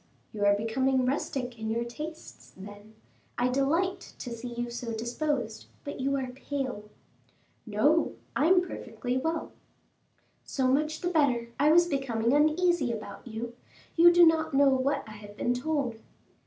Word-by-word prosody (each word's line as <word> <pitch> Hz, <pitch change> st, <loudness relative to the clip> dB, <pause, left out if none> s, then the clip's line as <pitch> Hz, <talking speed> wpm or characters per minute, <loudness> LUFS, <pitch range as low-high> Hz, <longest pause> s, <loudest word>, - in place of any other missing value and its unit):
"You 205 Hz, -1 st, -1 dB
are 200 Hz, 0 st, +5 dB
becoming 255 Hz, +5 st, +1 dB
rustic 250 Hz, -2 st, -2 dB
in 220 Hz, 0 st, -3 dB
your 230 Hz, +1 st, 0 dB
tastes, 305 Hz, +7 st, -9 dB
then; 205 Hz, +2 st, -12 dB, 0.4 s
I 245 Hz, +1 st, +2 dB
delight 330 Hz, +9 st, 0 dB
to 245 Hz, -, -7 dB
see 235 Hz, +1 st, -6 dB
you 240 Hz, 0 st, -4 dB
so 235 Hz, -1 st, -4 dB
disposed. 235 Hz, 0 st, -2 dB, 0.2 s
But 285 Hz, -, -6 dB
you 275 Hz, +1 st, 0 dB
are 260 Hz, -2 st, -3 dB
pale." 260 Hz, -5 st, -5 dB, 0.8 s
"No, 255 Hz, +11 st, +2 dB, 0.2 s
I 295 Hz, -, +3 dB
am 360 Hz, 0 st, +4 dB
perfectly 250 Hz, -1 st, -4 dB
well." 320 Hz, +4 st, -2 dB, 0.9 s
"So 265 Hz, -2 st, -1 dB
much 305 Hz, +4 st, +1 dB
the 355 Hz, -, 0 dB
better; 265 Hz, -8 st, +2 dB
I 295 Hz, +2 st, +5 dB
was 345 Hz, +2 st, +6 dB
becoming 265 Hz, -6 st, 0 dB
uneasy 310 Hz, -1 st, +3 dB
about 220 Hz, +2 st, -7 dB
you. 235 Hz, +1 st, -5 dB, 0.4 s
You 345 Hz, +1 st, +8 dB
do 345 Hz, 0 st, +7 dB
not 320 Hz, -3 st, +2 dB
know 280 Hz, 0 st, +6 dB
what 270 Hz, +1 st, +1 dB
I 215 Hz, -, -9 dB
have 205 Hz, 0 st, -12 dB
been 245 Hz, -, +1 dB
told." 250 Hz, -3 st, -2 dB
260 Hz, 155 wpm, -28 LUFS, 235-305 Hz, 0.9 s, You